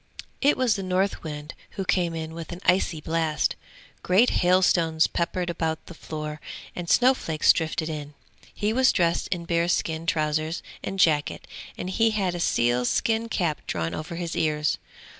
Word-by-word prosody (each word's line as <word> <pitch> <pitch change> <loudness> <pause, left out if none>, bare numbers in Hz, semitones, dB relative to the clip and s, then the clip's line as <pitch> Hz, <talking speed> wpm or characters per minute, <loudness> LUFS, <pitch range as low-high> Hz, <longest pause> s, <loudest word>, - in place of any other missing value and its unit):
It 285 +2 +4
was 250 -4 +2
the 195 - -3
Northwind 180 -5 -2 0.2
who 195 - -2
came 175 -3 +1
in 160 0 -5
with 165 0 -7
an 175 - -6
icy 180 -4 +2
blast; 160 -1 0 0.5
great 200 +7 +4
hailstones 175 -3 +4
peppered 175 +1 -1
about 160 -2 -2
the - - -10
floor 155 -1 -6 0.3
and 175 -1 -5
snow 255 +2 +5
flakes 160 -11 +3
drifted 160 0 -2
in. 150 -2 -6 0.4
He 210 +1 -1
was 260 +2 +4
dressed 170 -2 +1
in 175 -2 -3
bearskin 170 -1 0
trousers 155 +1 0 0.2
and 195 - -4
jacket, 155 -5 +2 0.3
and - - -4
he 225 +4 +2
had 200 -5 0
a 175 - -4
sealskin 125 - +1
cap 170 -8 -1
drawn 80 +1 -2
over 160 +3 -5
his 170 -1 -4
ears. 150 -1 0
170 Hz, 160 wpm, -25 LUFS, 155-185 Hz, 0.5 s, snow